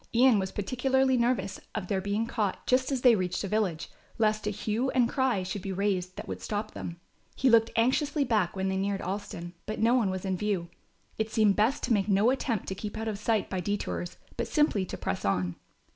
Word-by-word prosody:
Ian 245 -2 +6
was 190 -1 -2
particularly 260 +5 +1
nervous 235 -5 0 0.2
of 215 -4 -2
their 190 0 0
being 205 +3 -1
caught 215 -4 -2
just 255 +2 +2
as 265 -3 0
they 245 -2 +7
reached 185 -3 -1
a - - -2
village, 195 -6 -1 0.3
lest 215 -1 +1
a - - +3
hue 215 +5 -1
and 250 -2 +3
cry 255 -7 +1
should 185 +2 -4
be 195 - -4
raised 185 -1 -1
that - - -7
would - - -5
stop 215 0 -3
them. 170 0 -7 0.4
He 260 -1 +3
looked 225 0 +5
anxiously 280 +5 +2
back 215 -9 +1
when 190 0 -1
they 190 0 0
neared 195 0 -1
Alston, 185 -3 -5
but 215 - -3
no 230 +2 +4
one 235 -6 +3
was 185 0 -3
in 190 -1 -1
view. 190 -4 -1 0.5
It 220 0 0
seemed 215 -3 +3
best 225 +7 +2
to 240 - +2
make 200 -2 +1
no 205 +5 +4
attempt 240 -6 -1
to - - -2
keep 205 +2 -6
out 225 0 -3
of 210 -2 -3
sight 220 0 +1
by 190 - -3
detours, 180 -2 -3 0.2
but - - -1
simply 295 -11 +2
to - - -5
press 90 - -3
on. 90 -3 0
210 Hz, 220 wpm, -29 LUFS, 190-235 Hz, 0.5 s, they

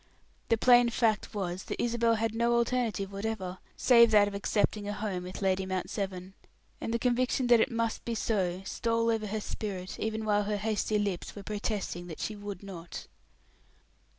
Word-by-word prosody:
The 230 - +4
plain 245 +1 +6
fact 225 -3 +1
was, 185 -2 -3
that - - -5
Isabel 235 -1 +2
had 225 0 -1
no 235 +1 +2
alternative 235 -4 0
whatever, 195 -3 -4 0.2
save 235 -2 +6
that 210 -2 +6
of 205 - -5
accepting 205 +1 0
a 205 - -2
home 205 -3 -3
with 180 +2 -7
Lady 190 0 +2
Mount 185 -1 -3
Severn; 190 -2 -4 0.5
and - - -3
the 235 - +1
conviction 250 +2 +1
that 240 -1 +6
it 225 - +3
must 230 -2 -1
be 235 - -3
so 190 -5 -1
stole 230 +1 0
over 220 -1 -1
her 215 +2 -2
spirit, 195 -3 -5
even 220 0 -2
while 205 -1 +2
her 210 0 -1
hasty 215 0 0
lips 200 -4 -2
were 205 - -8
protesting 205 -4 -3
that 160 - -8
she 215 - -3
would 205 -2 -7
not. 175 -4 -8
210 Hz, 180 wpm, -30 LUFS, 195-230 Hz, 0.5 s, plain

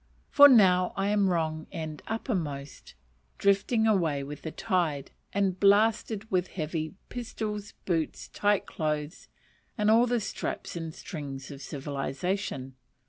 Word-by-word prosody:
for 285 0 +10
now 185 -7 +5
I 195 +1 +1
am 205 -2 +3
wrong 160 -2 -1
end 155 -4 -5
uppermost, 160 - -4 0.4
drifting 200 +3 +2
away 165 -10 +2
with 145 +2 -8
the 160 - -4
tide, 160 -7 -1 0.2
and 195 -2 0
ballasted 215 +1 +3
with 185 -1 +1
heavy 160 0 -4
pistols, 215 -4 -5
boots, 165 -4 -1
tight 205 -1 +1
clothes, 150 +1 -3 0.5
and 210 0 +3
all 235 +2 +5
the 240 0 +1
straps 195 -3 -4
and 165 -1 -4
strings 140 -5 -7
of 140 -1 -9
civilization. 140 +1 -3
180 Hz, 130 wpm, -28 LUFS, 155-205 Hz, 0.5 s, for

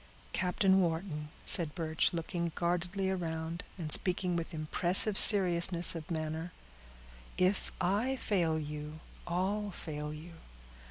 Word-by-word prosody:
"Captain 190 +1 +2
Wharton," 160 -3 -3 0.2
said 160 -4 +4
Birch, 160 -2 0
looking 170 0 -4
guardedly 180 +3 -2
around 165 -2 -4
and 160 -4 -5
speaking 180 +1 +1
with 165 +1 -4
impressive 175 +6 +5
seriousness 180 -4 +4
of 165 -2 -8
manner, 160 +1 -4 0.9
"if 185 +2 0
I 205 +9 0
fail 175 -10 0
you, 150 0 -7 0.3
all 195 +4 -2
fail 150 -5 -7
you. 155 +3 -10
170 Hz, 115 wpm, -31 LUFS, 160-185 Hz, 0.9 s, impressive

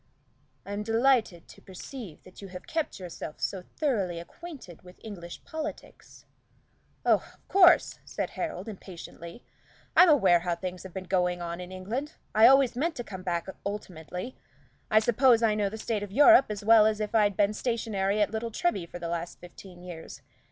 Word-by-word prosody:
"I'm 205 +1 -4
delighted 225 -5 +1
to - - -15
perceive 190 - -10
that 185 - -15
you 200 - -8
have 180 -1 -10
kept 320 -9 -3
yourself 175 -4 -8
so 190 - -2
thoroughly 195 - -2
acquainted 220 - -11
with 180 0 -16
English 175 -6 -9
politics." 315 -2 -8 0.8
"Oh, - - +5 0.2
of - - -36
course," 365 -2 +5
said - - -4
Harold, 320 -7 -4
impatiently. 180 -1 -10 0.5
"I'm 360 - +8
aware 195 - +5
how 175 0 -2
things 180 0 -6
have 190 - -10
been 190 - -4
going 180 -2 0
on 170 0 -5
in 180 0 -8
England. 225 +11 -4 0.2
I 220 +1 +7
always 270 -2 +5
meant 320 +5 -1
to 240 - -5
come 190 -5 -8
back 175 -2 -2 0.2
ultimately. 185 +2 -6 0.5
I 215 - +6
suppose 240 +1 +4
I 220 -2 +4
know 210 -1 0
the 220 - -7
state 220 -1 -2
of 205 -1 -6
Europe 290 - +7
as 205 -1 -5
well 220 -1 +7
as 215 -1 0
if 210 0 -3
I'd 205 -3 +3
been 205 0 +3
stationary 215 -4 -1
at 205 - -2
Little 225 +1 -3
Treby 210 -6 -1
for - - -7
the 170 -1 -5
last 170 0 -4
fifteen 175 0 -13
years. 170 -3 -9
205 Hz, 180 wpm, -28 LUFS, 180-235 Hz, 0.8 s, I'm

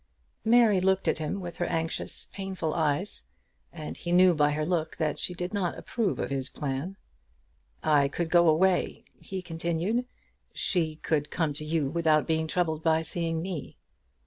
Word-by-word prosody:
Mary 225 -3 +5
looked 190 +1 +2
at - - +2
him 155 +6 -2
with 175 -2 -7
her 175 - 0
anxious, 165 0 -1
painful 190 -5 -3
eyes, 160 +4 0 0.5
and 155 -3 -7
he 175 - -4
knew 180 0 +6
by 150 -2 +3
her 150 +1 -1
look 170 -2 -1
that 155 -2 -1
she 180 - 0
did 180 +3 -4
not 190 -4 -1
approve 225 -6 -1
of - - -3
his 135 -1 -2
plan. 145 +8 -4 0.9
"I 145 -2 +4
could 165 +3 -3
go 175 -1 +6
away," 180 +3 +2
he 190 -1 -6
continued. 170 +8 -1 0.5
"She 160 -4 +1
could 155 -1 -1
come 160 -4 0
to 150 +2 -6
you 155 -2 0
without 160 -2 +3
being 160 -1 0
troubled 160 -2 0
by 160 0 +2
seeing 165 -1 -1
me. 180 -6 -6
165 Hz, 170 wpm, -28 LUFS, 155-185 Hz, 0.9 s, knew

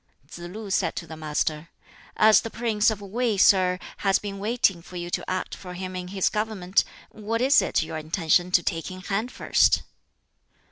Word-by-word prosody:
Tsz 165 - -11
lu 195 +4 -7
said - - 0
to 170 - -5
the 160 - -9
Master, 155 +1 -2 0.5
"As 215 -2 +6
the 225 - -6
prince 225 -2 +1
of 215 -2 -4
Wei, 220 +2 -1
sir, 185 -2 +4 0.2
has 195 -1 +2
been 200 -1 -6
waiting 205 -4 +1
for 180 - -13
you 175 0 -5
to - - -3
act 185 0 -3
for 180 -1 -8
him 185 0 -6
in 180 0 -5
his 190 0 0
government, 210 -3 0 0.3
what 220 +2 -3
is 265 +4 +5
it - - 0
your 160 0 -6
intention 165 +2 +1
to 180 -1 +3
take 165 -1 -2
in 185 0 -9
hand 210 +6 -2
first?" - - +2
190 Hz, 190 wpm, -25 LUFS, 175-215 Hz, 0.5 s, As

